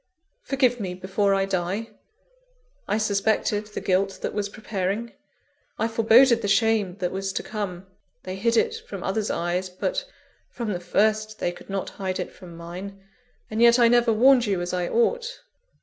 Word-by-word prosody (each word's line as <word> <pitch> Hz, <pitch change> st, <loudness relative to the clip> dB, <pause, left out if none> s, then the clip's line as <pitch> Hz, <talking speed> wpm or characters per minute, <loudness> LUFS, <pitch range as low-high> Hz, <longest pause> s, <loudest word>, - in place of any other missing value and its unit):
_ -, -, -30 dB
Forgive 255 Hz, -3 st, +2 dB
me 185 Hz, -4 st, -4 dB
before 195 Hz, +2 st, +1 dB
I 195 Hz, 0 st, +1 dB
die! 195 Hz, +4 st, -2 dB, 1.0 s
I 205 Hz, -, +1 dB
suspected 210 Hz, 0 st, 0 dB
the 210 Hz, -, -6 dB
guilt 195 Hz, +1 st, +1 dB
that -, -, -2 dB
was 205 Hz, -1 st, -2 dB
preparing 210 Hz, +1 st, -3 dB, 0.6 s
I 225 Hz, -, +1 dB
foreboded 230 Hz, +2 st, +5 dB
the 205 Hz, -, -2 dB
shame 215 Hz, -4 st, +2 dB
that 180 Hz, -3 st, -2 dB
was 195 Hz, 0 st, -3 dB
to -, -, -2 dB
come 195 Hz, -4 st, -5 dB, 0.4 s
they 185 Hz, 0 st, -5 dB
hid 230 Hz, +4 st, +1 dB
it 455 Hz, -, +2 dB
from -, -, -6 dB
others' 215 Hz, -1 st, -1 dB
eyes; 175 Hz, +2 st, -1 dB
but, 185 Hz, -, -2 dB, 0.5 s
from 230 Hz, -4 st, -4 dB
the 175 Hz, -, -3 dB
first, 215 Hz, +4 st, +1 dB
they 175 Hz, -, -1 dB
could 175 Hz, -, -14 dB
not 195 Hz, -1 st, -3 dB
hide 185 Hz, -1 st, -2 dB
it -, -, -4 dB
from 175 Hz, -2 st, -12 dB
mine 185 Hz, +4 st, -8 dB, 0.5 s
and 220 Hz, +1 st, -1 dB
yet 235 Hz, 0 st, +7 dB
I 235 Hz, -1 st, +5 dB
never 240 Hz, -1 st, +4 dB
warned 245 Hz, +2 st, +5 dB
you 195 Hz, -3 st, 0 dB
as 175 Hz, +1 st, -3 dB
I 180 Hz, -1 st, -1 dB
ought! 480 Hz, -, 0 dB
205 Hz, 180 wpm, -25 LUFS, 185-230 Hz, 1.0 s, yet